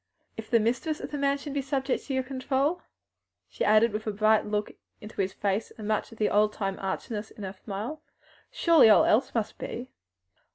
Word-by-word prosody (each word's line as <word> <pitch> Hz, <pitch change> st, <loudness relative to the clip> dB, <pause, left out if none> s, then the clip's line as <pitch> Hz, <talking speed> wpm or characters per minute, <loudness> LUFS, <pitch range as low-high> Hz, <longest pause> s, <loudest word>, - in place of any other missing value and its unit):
If 220 Hz, -1 st, -8 dB
the 235 Hz, -, +4 dB
mistress 250 Hz, +8 st, -1 dB
of -, -, -7 dB
the 295 Hz, -, -3 dB
mansion 280 Hz, +1 st, -1 dB
be 285 Hz, -, 0 dB
subject 270 Hz, -1 st, -2 dB
to 275 Hz, -, -4 dB
your 260 Hz, -, +1 dB
control," 275 Hz, +5 st, -1 dB, 0.7 s
she -, -, -4 dB
added, 215 Hz, +1 st, +4 dB
with 215 Hz, +1 st, -4 dB
a -, -, +1 dB
bright 215 Hz, +1 st, +3 dB
look 210 Hz, 0 st, -1 dB
up -, -, -25 dB, 0.2 s
into 210 Hz, -1 st, -5 dB
his 190 Hz, 0 st, -1 dB
face, 200 Hz, +2 st, -1 dB
and 215 Hz, -2 st, -6 dB
much 215 Hz, +1 st, -1 dB
of 225 Hz, -, -13 dB
the 215 Hz, -, +2 dB
old 210 Hz, +1 st, +3 dB
time 195 Hz, -2 st, -3 dB
archness 210 Hz, +3 st, -4 dB
in 210 Hz, -, -11 dB
her 190 Hz, 0 st, -5 dB
smile, 215 Hz, +10 st, -6 dB, 0.5 s
"surely 335 Hz, -, +5 dB
all 215 Hz, -, +7 dB
else 250 Hz, +4 st, +2 dB
must 220 Hz, -1 st, -2 dB
be." 245 Hz, +2 st, -6 dB
220 Hz, 205 wpm, -28 LUFS, 210-270 Hz, 0.7 s, all